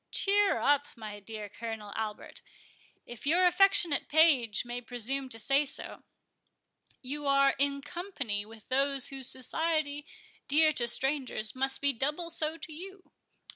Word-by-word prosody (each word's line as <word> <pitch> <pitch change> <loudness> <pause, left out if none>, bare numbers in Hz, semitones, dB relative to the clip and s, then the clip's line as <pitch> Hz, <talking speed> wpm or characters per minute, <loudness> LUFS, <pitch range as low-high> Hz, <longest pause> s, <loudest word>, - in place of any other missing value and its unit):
Cheer 405 0 +3
up, 290 0 +2
my 215 -3 -8
dear 210 +1 -7
Colonel 215 -1 -7
Albert, 215 -1 -5 0.6
if 240 +3 -8
your 350 +4 +4
affectionate 355 -4 +3
page 290 -9 +4
may 240 0 -5
presume 255 +3 -2
to 225 - -1
say 275 +6 +2
so—you 285 0 -9
are 275 0 +5
in 280 0 +1
company 280 - -4
with 220 0 -14
those 275 0 +1
whose 270 -2 -2
society, 295 +2 -1 0.4
dear 310 +2 +5
to 240 -4 +1
strangers, 255 -4 +1
must 265 +1 -2
be 280 0 +2
doubly 300 +7 -2
so 315 -1 -1
to 315 0 -8
you. 380 +4 -10
275 Hz, 135 wpm, -30 LUFS, 240-310 Hz, 0.6 s, are